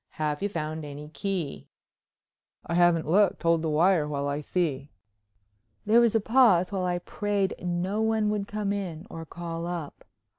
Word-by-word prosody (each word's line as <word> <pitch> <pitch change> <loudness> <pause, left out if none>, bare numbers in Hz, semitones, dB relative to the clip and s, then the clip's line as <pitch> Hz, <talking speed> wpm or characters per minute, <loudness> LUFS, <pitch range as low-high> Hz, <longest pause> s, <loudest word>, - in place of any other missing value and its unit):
Have 150 -1 -1
you 205 - 0
found 155 -3 -4
any 145 +1 -8
key?" 170 -1 -4 1.0
"I - - -4
haven't 175 -2 +3
looked. 190 +3 +3
Hold 165 -1 +3
the 160 - -1
wire 160 0 +3
while 140 -1 -2
I 145 +1 -2
see?" 145 -4 -2 1.0
There 225 +3 +5
was 230 -2 +3
a - - +5
pause 215 -6 +4
while 190 -2 -1
I 180 0 0
prayed 200 +2 -1
no 180 +4 -1
one 220 -1 +1
would 205 -1 -2
come 205 -1 -2
in 180 -4 -5
or 165 -1 -7
call 170 0 -5
up. 170 -4 -6
175 Hz, 170 wpm, -27 LUFS, 155-200 Hz, 1.0 s, There